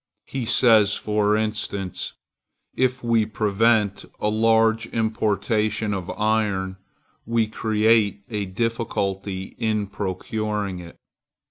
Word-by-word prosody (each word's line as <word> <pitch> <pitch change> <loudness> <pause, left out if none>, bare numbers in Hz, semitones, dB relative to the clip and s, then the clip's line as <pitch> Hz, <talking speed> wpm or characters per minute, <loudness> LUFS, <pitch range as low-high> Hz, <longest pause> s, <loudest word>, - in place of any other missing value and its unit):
He 130 -3 -4
says, 110 -3 +5
for 105 0 +1
instance: 105 -4 -3 0.6
If 130 0 0
we 115 -2 +3
prevent 105 -1 +1 0.2
a 105 - +1
large 115 +1 +3
importation 110 -1 0
of 95 -2 -4
iron, 105 -3 0 0.5
we 115 -1 +2
create 110 -1 +2
a 105 -4 -3
difficulty 100 -3 -2
in 110 -2 0
procuring 100 0 -3
it. 85 -1 -11
105 Hz, 100 wpm, -23 LUFS, 100-110 Hz, 0.6 s, says